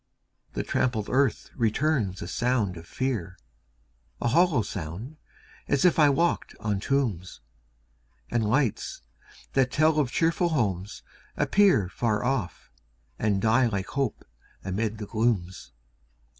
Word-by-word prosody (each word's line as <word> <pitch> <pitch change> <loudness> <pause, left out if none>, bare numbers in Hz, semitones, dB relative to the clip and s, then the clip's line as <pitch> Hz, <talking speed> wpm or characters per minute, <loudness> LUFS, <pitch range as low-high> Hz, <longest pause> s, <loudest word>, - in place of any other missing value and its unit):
The - - -2
trampled 110 -5 -1
earth 135 -2 +1
returns 115 -4 0
a - - -6
sound 120 -7 0
of 85 0 -11
fear 115 -9 -3 0.8
A 120 - 0
hollow 160 -3 +3
sound, 100 - -6 0.5
as 140 +3 +2
if 175 -2 +4
I 150 -2 +7
walked 170 +5 0
on 105 -2 -1
tombs! 110 -8 -1 0.9
And 120 -1 +1
lights, 115 +1 0 0.5
that 130 -2 +3
tell 155 +2 +3
of 140 -5 +1
cheerful 165 +1 +1
homes, 105 - -2 0.3
appear 195 - +4
Far 105 +2 -1
off, 125 -9 -2 0.5
and 105 -3 +1
die 120 +3 +4
like 100 -4 -3
hope 135 -5 -2 0.4
amid 105 +3 -2
the 105 - -5
glooms. 100 - -1
115 Hz, 125 wpm, -27 LUFS, 100-140 Hz, 0.9 s, I